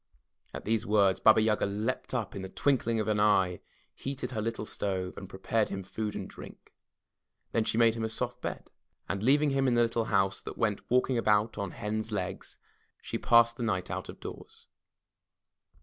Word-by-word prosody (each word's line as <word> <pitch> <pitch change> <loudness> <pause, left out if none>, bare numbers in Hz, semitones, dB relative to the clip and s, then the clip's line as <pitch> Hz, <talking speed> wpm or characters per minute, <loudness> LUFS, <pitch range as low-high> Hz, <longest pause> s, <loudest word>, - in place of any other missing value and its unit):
*' - - -40
At - - -7
these 110 0 +1
words 100 -2 +3
Baba 110 0 +6
Yaga 105 -2 +2
leaped 110 +6 -2
up 115 -5 -2
in 100 - -4
the 95 - -6
twinkling 115 -2 +1
of 110 - -1
an 105 -1 +1
eye, 95 -4 +3 0.3
heated 135 -2 -5
her 110 -3 -2
little 115 0 -3
stove, 95 -3 -3
and 95 - -9
prepared 105 +3 0
him 95 -1 -4
food 105 +3 -4
and - - -4
drink. - - -12 0.8
Then 115 -1 +1
she - - 0
made 115 -1 +5
him 115 0 -4
a 110 - -1
soft 110 - -3
bed, - - -5 0.4
and 100 - -2
leaving 145 +5 +4
him 135 0 +2
in 125 - +3
the 120 - +5
little 115 -1 0
house 95 -3 +1
that - - -8
went 105 -3 0
walking 125 0 +2
about 105 0 +2
on 100 -2 -2
hen*s 110 +4 -4
legs, 95 -2 -4 0.4
she - - -4
passed 115 0 +5
the - - -6
night 95 -5 -1
out - - -4
of - - -9
doors. - - -10
110 Hz, 195 wpm, -30 LUFS, 100-115 Hz, 0.8 s, Baba